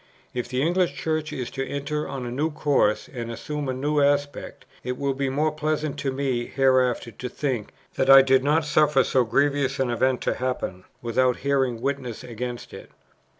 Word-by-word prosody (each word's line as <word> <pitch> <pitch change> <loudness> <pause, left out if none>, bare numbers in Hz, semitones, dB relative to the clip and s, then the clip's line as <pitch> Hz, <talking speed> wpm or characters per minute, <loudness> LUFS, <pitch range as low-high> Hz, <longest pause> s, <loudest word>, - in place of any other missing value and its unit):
"If 125 -1 -3
the 130 +1 0
English 175 +2 +1
Church 155 -1 -2
is 125 -3 -4
to 135 -1 -3
enter 145 +2 -3
on 135 -2 -5
a 120 - -4
new 145 +6 0
course, 145 -8 +1
and 120 -2 -6
assume 145 +5 -4
a - - 0
new 145 +3 0
aspect, 145 0 -1 0.2
it 125 0 -3
will 140 -1 0
be 135 0 -1
more 150 +4 +1
pleasant 155 -1 -2
to 140 -1 -1
me 130 -3 -1
hereafter 130 -3 +2
to 125 +4 -6
think, 125 -5 -3 0.2
that 130 - 0
I 135 0 +10
did 130 0 +3
not 150 +2 +2
suffer 150 -2 +3
so 130 - +2
grievous 140 +3 +1
an 130 -2 +1
event 130 +1 +1
to - - 0
happen, 120 -7 -3 0.2
without 125 +2 +1
bearing 135 -4 +1
witness 130 -3 -3
against 120 0 -6
it. - - -10
135 Hz, 190 wpm, -24 LUFS, 125-145 Hz, 0.2 s, I